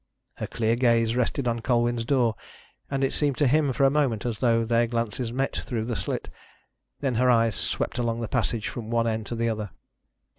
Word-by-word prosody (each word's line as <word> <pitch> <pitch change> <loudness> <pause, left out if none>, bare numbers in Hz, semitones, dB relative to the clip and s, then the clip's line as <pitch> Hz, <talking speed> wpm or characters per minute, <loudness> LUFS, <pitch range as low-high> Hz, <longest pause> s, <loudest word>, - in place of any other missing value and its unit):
Her - - -4
clear 115 0 0
gaze 115 -2 +2
rested 125 +1 0
on 115 0 0
Colwyn's 120 0 +1
door, 125 -4 +2 0.6
and 135 -1 -1
it 135 - +1
seemed 145 -3 0
to 145 - +3
him 145 +1 +3
for 135 +2 0
a 135 - +4
moment 135 -8 0
as 115 -3 -2
though 115 -2 +2
their 115 +1 +2
glances 115 0 -2
met 135 +3 -1
through 115 -3 -3
the 120 0 -2
slit, - - -3 0.7
then 135 -3 0
her 125 - +4
eyes 115 -2 +4
swept 120 - +1
along 115 -1 -1
the 115 - -3
passage 115 -1 -1
from 115 -2 -6
one 115 0 +1
end 110 -2 -2
to 120 - -4
the 115 0 0
other. 110 -2 -3
120 Hz, 210 wpm, -26 LUFS, 115-125 Hz, 0.7 s, a